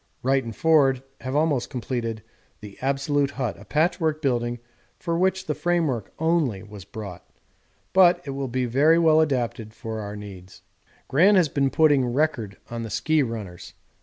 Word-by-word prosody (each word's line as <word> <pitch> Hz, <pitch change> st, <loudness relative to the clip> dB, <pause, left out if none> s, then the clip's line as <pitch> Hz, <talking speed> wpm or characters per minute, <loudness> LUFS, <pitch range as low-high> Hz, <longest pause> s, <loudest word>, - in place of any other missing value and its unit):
Wright 135 Hz, +1 st, +2 dB
and 115 Hz, -2 st, -7 dB
Forde 140 Hz, -6 st, +3 dB, 0.2 s
have 130 Hz, +1 st, -4 dB
almost 150 Hz, -5 st, +1 dB
completed 115 Hz, -4 st, -4 dB, 0.4 s
the 105 Hz, -2 st, -11 dB
absolute 140 Hz, +1 st, 0 dB
hut, 130 Hz, -6 st, -3 dB
a 105 Hz, -, -13 dB
patchwork 155 Hz, +1 st, 0 dB
building 120 Hz, -4 st, -1 dB, 0.4 s
for 170 Hz, -2 st, -2 dB
which 190 Hz, +2 st, +1 dB
the 150 Hz, -, -1 dB
framework 160 Hz, -, -1 dB
only 160 Hz, -, 0 dB
was 105 Hz, -2 st, -11 dB
brought 100 Hz, -4 st, -8 dB, 0.7 s
but 180 Hz, -2 st, +6 dB
it 140 Hz, -, -4 dB
will 135 Hz, 0 st, -3 dB
be 130 Hz, +1 st, -1 dB
very 145 Hz, +7 st, +4 dB
well 160 Hz, -2 st, +5 dB
adapted 120 Hz, -7 st, -2 dB
for 110 Hz, -1 st, -6 dB
our 105 Hz, -1 st, -6 dB
needs. 95 Hz, -3 st, -11 dB, 0.4 s
Gran 185 Hz, +9 st, +5 dB
has 175 Hz, -5 st, +4 dB
been 140 Hz, -1 st, +1 dB
putting 145 Hz, -2 st, +4 dB
'record' 120 Hz, -5 st, -1 dB
on 115 Hz, 0 st, -4 dB
the 115 Hz, -, -5 dB
ski 155 Hz, +9 st, +1 dB
runners. 110 Hz, -9 st, -6 dB
135 Hz, 165 wpm, -24 LUFS, 115-155 Hz, 0.7 s, but